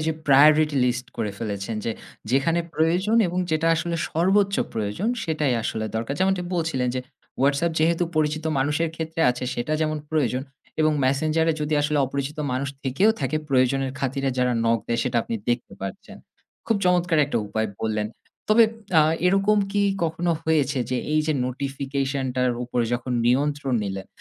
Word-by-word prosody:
যে - - +2
priority 150 +2 +5
list 125 0 -1
করে 110 -3 -2
ফেলেছেন 105 0 -4
যে, - - -1 0.4
যেখানে 140 +6 +2
প্রয়োজন 180 +7 +2
এবং 180 +1 -3
যেটা 160 +1 +1
আসলে 170 +1 -2
সর্বোচ্চ 195 +4 +2 0.2
প্রয়োজন, 110 - -2 0.2
সেটাই 150 -5 0
আসলে 110 0 -2
দরকার। 115 +5 -2
যেমনটি 190 -1 +2
বলছিলেন 160 -7 0
যে 130 - -1 0.4
WhatsApp 145 +5 +2
যেহেতু 165 +2 +2
পরিচিত 155 0 0
মানুষের 150 +5 +1
ক্ষেত্রে 160 +1 -4
আছে 125 +1 -4
সেটা 120 +6 -2
যেমন 155 -1 0
প্রয়োজন, 130 -5 0 0.4
এবং 155 0 +4
Messenger 155 +5 +1
এ - - -5
যদি 150 +1 0
আসলে 150 0 +1
অপরিচিত 140 +3 -4
মানুষ 135 +2 -1
থেকেও 140 - +3
থাকে 155 - 0
প্রয়োজনের 135 0 +2
খাতিরে 135 +1 -1
যারা 125 0 +2
knock 115 0 +2
দেয় 115 - 0
সেটা 125 -2 -1
আপনি 115 - -4
দেখতে 120 0 -1
পাচ্ছেন। 95 0 -7 0.5
খুব 225 - +2
চমৎকার 180 -2 +2
একটা 145 - -1
উপায় 110 +2 -1
বললেন। 110 -1 -1 0.4
তবে 220 +2 +7 0.3
আ - - +7 0.2
এরকম 195 +3 +3
কি 205 0 +2 0.2
কখনো 165 +2 -1
হয়েছে 145 -3 +1
যে 130 - 0 0.2
এই 155 - +3
যে 155 - +2
নোটিফিকেশন 135 +1 -3
টার 125 -1 +2
উপরে 120 -1 -1
যখন 120 +1 -3
নিয়ন্ত্রণ 140 +1 +1
নিলেন, 95 -1 -5
145 Hz, 165 wpm, -24 LUFS, 125-160 Hz, 0.5 s, তবে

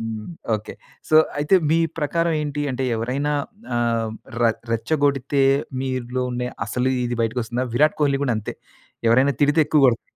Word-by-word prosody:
హ్మ్. 110 -1 -5 0.3
Okay. 105 - -9 0.4
So 155 - +5 0.2
అయితే 150 +6 +2 0.2
మీ 165 - +4 0.2
ప్రకారం 165 +2 0
ఏంటి 145 -1 -3
అంటే 130 +1 -2
ఎవరైనా 135 +6 -1 0.4
ఆహ్, 115 -2 0 0.3
ర - - +4 0.3
రెచ్చగొడితే 140 +2 +1 0.4
మీలో 130 -1 -2
ఉండే 125 0 -2 0.2
అసలు 125 +1 0
ఇది 120 0 -2
బయటకొస్తుందా? 120 +2 -1
విరాట్ 150 +5 +3
కోహ్లి 140 -2 +2
గూడంతే 110 -5 -2 0.5
ఎవరైనా 130 +4 +4
తిడితే 145 +2 +4
ఎక్కువ 150 -1 +3
గోడుత్ 115 -2 +1
130 Hz, 140 wpm, -22 LUFS, 120-145 Hz, 0.5 s, So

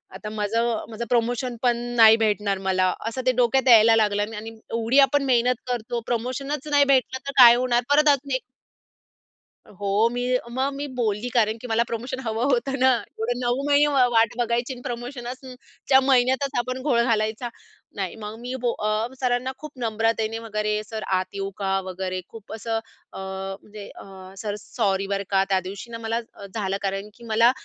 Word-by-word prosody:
आता 210 +2 -7
माझं 220 +2 -1
माझं 230 +1 -5
प्रमोशन 245 +1 0
पण 240 -1 +3 0.2
नाही 225 -1 +9
भेटणार 210 -3 0
मला 185 -1 +1
असं 255 +3 -3
ते 255 - +5
डोक्यात 255 +2 +2
यायला 225 0 +7
लागलं 210 0 +1
आणि 220 +2 -6 0.2
एवढी 230 +4 +2
आपण 280 +1 +4
मेहनत 250 -1 +3
करतो 240 -1 -2
प्रमोशनच 260 +5 -3
नाही 285 -1 +5
भेटलं 260 -1 +2
तर 275 - -1
काय 240 -1 +10
होणार 245 -1 +1
परत 300 +1 +4
आजून 280 0 +1
एक 260 - -1 1.3
हो, 205 +3 0
मी 245 0 -2 0.3
मग 265 +3 -1
मी 285 +1 -4
बोलली 225 0 -1
कारण 220 -2 +2
की 250 - -9
मला 230 +1 +2
प्रमोशन 245 +3 -4
हवं 225 +2 -1
होतं 265 +2 0
ना. 260 - +5 0.3
एवढं 245 +2 -1
9 245 +2 0
महिने 290 +1 +4
वा 255 -2 +5
वाट 225 -1 +4
बघायची 240 +2 -1
आणि 245 - -11
प्रमोशनसच 245 +1 -6 0.4
च्या 265 -1 +7
महिन्यातच 265 +1 +2
आपण 255 +1 -3
घोळ 255 -5 +2
घालायचा. 225 +1 0 0.5
नाही 195 -3 -3
मग 210 +1 -7
मी 245 +2 -6
बो 240 -1 +1
अ, 215 +2 0
सरांना 250 0 0
खूप 305 +1 -9
नम्रतेने 225 0 0
वगैरे 215 -1 -2
"सर 220 0 -6
आत 185 0 0
येऊ 195 0 -3
का?" 195 -1 0
वगैरे 185 0 -4
खूप 220 -2 -11
असं 225 +1 -2 0.3
अ, - - -7 0.4
म्हणजे 210 -1 -11
अ, 190 -1 -12
"सर 205 -2 -3
सॉरी 195 -4 -1
बरं 200 0 -1
का. 195 -1 +3
त्यादिवशी 195 +4 -2
ना 230 - -5
मला 225 0 -2 0.2
अ, 200 - -11
झालं 195 -2 -1
कारण 195 +1 -3
की 235 - -16
मला 230 +1 +4
230 Hz, 180 wpm, -24 LUFS, 210-250 Hz, 1.3 s, काय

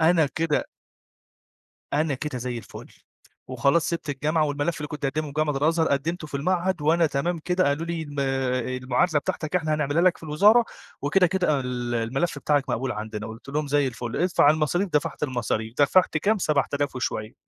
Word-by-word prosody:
أنا 160 -1 +4
كده 160 -2 0 1.3
أنا 150 -1 +1
كده 140 -1 -4
زي 120 0 -4
الفُل، 115 - -10 0.6
وخلاص 140 +6 +2
سِبت 170 -2 -3
الجامعة، 155 +3 +1
والملف 145 +3 -1
اللي 150 -1 -5
كنت 150 0 -6
هاقدّمه 150 +3 -1
في 145 - -8
جامعة 155 -1 0
الأزهر 160 +3 +2
قدّمته 155 +4 -1
في 145 - -4
المعهد، 180 +3 0
وأنا 165 +2 +3
تمام 160 +4 -1
كده 180 +3 0
قالوا 145 +4 0
لي 170 -1 -3
الما 145 -2 -4
آآ، 130 -1 0 0.2
المعادلة 130 +6 +1
بتاعتك 155 +4 -2
إحنا 160 -3 0
هنعملها 150 +2 +1
لك 185 -1 +4
في - - -22
الوزارة، 205 +10 +5 0.4
وكده، 180 +6 +4
كده 180 -1 0
أنا 145 -3 +2
ال 125 -1 -3
الملف 135 +7 -1
بتاعك 145 -1 +1
مقبول 125 +1 -1
عندنا، 105 0 -5
قُلت 110 +4 -11
لهم 150 +2 -1
زي 145 0 +2
الفُل، 120 -2 -5
ادفع 175 -4 +4
المصاريف، 155 +5 +1
دفَعت 150 0 -1
المصاريف، 120 -4 -2
دفَعت 160 +4 +4
كام؟ 205 +7 +2
7000 145 -4 0
وشوية، 110 -3 -3
150 Hz, 180 wpm, -25 LUFS, 135-165 Hz, 1.3 s, الوزارة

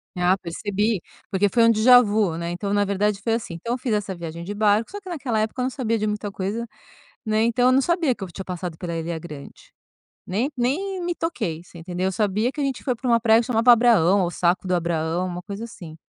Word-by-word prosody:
Ah, 180 +1 +2
percebi, 205 +4 -2 0.3
porque 200 +1 +2
foi 235 +2 +3
um 230 - +6
déjà-vu 215 -6 +5
né. 170 0 -3
Então, 200 +3 -3
na 205 - +3
verdade, 200 +1 0
foi 225 +2 0
assim: 225 -7 -3
então 230 +8 -3
eu - - -5
fiz 245 -3 -2
essa 205 -2 -2
viagem 170 0 -7
de 205 +4 -5
barco, 210 +1 +2
só 410 - -6
que 380 - -11
naquela 270 -10 -2
época 220 +4 -2
eu - - +1
não 255 - 0
sabia 235 -4 -1
de 215 - -1
muita 210 -1 -3
coisa, 205 +5 -3 0.6
né. 215 0 +1
Então 235 +2 +2
eu 255 - +5
não 270 - +4
sabia 340 -4 +1
que 210 - -14
eu - - -8
tinha 190 - -7
passado 180 -2 -5
pela 170 -2 -4
Ilha 165 0 -3
Grande, 150 -4 -11 0.5
nem 225 +10 -1
nem 360 +11 -1
me 350 0 -2
toquei, 215 - -3
você 175 - -15
entendeu. 180 +2 -3
Eu 190 - +1
sabia 210 +4 0
que 290 - -5
a - - +1
gente 270 -2 -2
foi 255 -3 0
pra 250 +2 -6
uma 235 -1 +4
praia 225 -1 +5
que - - -7
chamava 245 0 +5
Abraão 215 -6 +5
ou 175 - 0
Saco 180 +2 0
do 180 - +2
Abraão, 170 0 -1
uma 180 0 -5
coisa 200 +3 -7
assim, 175 -8 -9
210 Hz, 245 wpm, -23 LUFS, 180-240 Hz, 0.6 s, um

